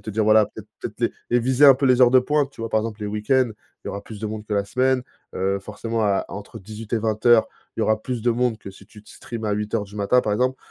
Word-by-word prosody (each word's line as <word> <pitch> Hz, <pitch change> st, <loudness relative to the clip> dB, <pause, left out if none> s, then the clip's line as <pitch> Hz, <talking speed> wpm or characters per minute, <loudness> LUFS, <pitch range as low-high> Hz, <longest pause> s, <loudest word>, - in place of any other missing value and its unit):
te -, -, -12 dB
dire 110 Hz, 0 st, 0 dB
voilà, 110 Hz, 0 st, +5 dB
peut-être -, -, -10 dB
les -, -, 0 dB, 0.2 s
les 120 Hz, -, +3 dB
viser 130 Hz, +4 st, +4 dB
un 135 Hz, -, +9 dB
peu 135 Hz, -, -2 dB
les 130 Hz, -1 st, +4 dB
heures 125 Hz, -1 st, +7 dB
de 130 Hz, 0 st, +6 dB
pointe 145 Hz, +1 st, 0 dB
tu 115 Hz, -, -10 dB
vois? 115 Hz, -, -4 dB
Par 110 Hz, -, +2 dB
exemple 110 Hz, -1 st, -6 dB
les 105 Hz, -, -2 dB
week-ends, 115 Hz, +4 st, +1 dB, 0.3 s
il -, -, -5 dB
y -, -, -3 dB
aura 100 Hz, -, -6 dB
plus 110 Hz, -2 st, -10 dB
de 110 Hz, -, -4 dB
monde 105 Hz, 0 st, -6 dB
que 105 Hz, -, -2 dB
la 100 Hz, -, +1 dB
semaine, 130 Hz, +4 st, +1 dB, 0.3 s
heu, 95 Hz, +1 st, 0 dB
forcément 115 Hz, +3 st, -4 dB
à 100 Hz, -2 st, +1 dB
entre 105 Hz, +2 st, -8 dB
18 110 Hz, +2 st, -10 dB
et -, -, +1 dB
20:00 110 Hz, +1 st, +3 dB, 0.3 s
il -, -, -2 dB
y -, -, +2 dB
aura 110 Hz, 0 st, +1 dB
plus 120 Hz, -1 st, -4 dB
de 120 Hz, -, +2 dB
monde 120 Hz, -1 st, 0 dB
que 100 Hz, -2 st, -10 dB
si 100 Hz, +1 st, -16 dB
tu 105 Hz, -1 st, -16 dB
te 105 Hz, -, -18 dB
stream 115 Hz, -2 st, -8 dB
à 105 Hz, -, 0 dB
8:00 105 Hz, +1 st, -2 dB
du 100 Hz, +1 st, -15 dB
matin 105 Hz, +5 st, +2 dB
par 105 Hz, -, -1 dB
exemple. 125 Hz, +4 st, +1 dB
110 Hz, 290 wpm, -22 LUFS, 105-125 Hz, 0.3 s, un